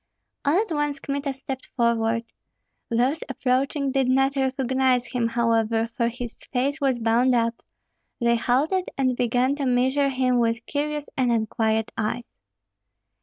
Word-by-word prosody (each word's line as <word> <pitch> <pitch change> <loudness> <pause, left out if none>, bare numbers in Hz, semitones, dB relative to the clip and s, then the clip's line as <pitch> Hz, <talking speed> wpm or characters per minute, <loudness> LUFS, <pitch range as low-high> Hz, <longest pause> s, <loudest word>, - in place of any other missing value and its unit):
All 300 +6 +4
at 435 -3 -2
once 295 -2 -1
Kmita 280 0 -2
stepped 265 0 -7
forward. 230 -1 +1 0.7
Those 250 +7 +1
approaching 270 +2 0
did 265 -1 +1
not 270 +1 +3
recognize 260 -2 +1
him, 240 -1 -1
however, 230 -1 +1
for 235 -2 +1
his 240 0 -6
face 275 +3 -1
was 265 -3 +1
bound 235 +3 +3
up; 230 0 0 0.6
they 235 0 +3
halted, 300 +11 +1
and 255 -2 +1
began 245 +2 +1
to 285 - -2
measure 260 +3 +2
him 255 -2 +1
with 230 -1 0
curious 295 0 -2
and 250 -2 +1
unquiet 220 -1 0
eyes. 225 +2 -2
255 Hz, 140 wpm, -24 LUFS, 235-275 Hz, 0.7 s, All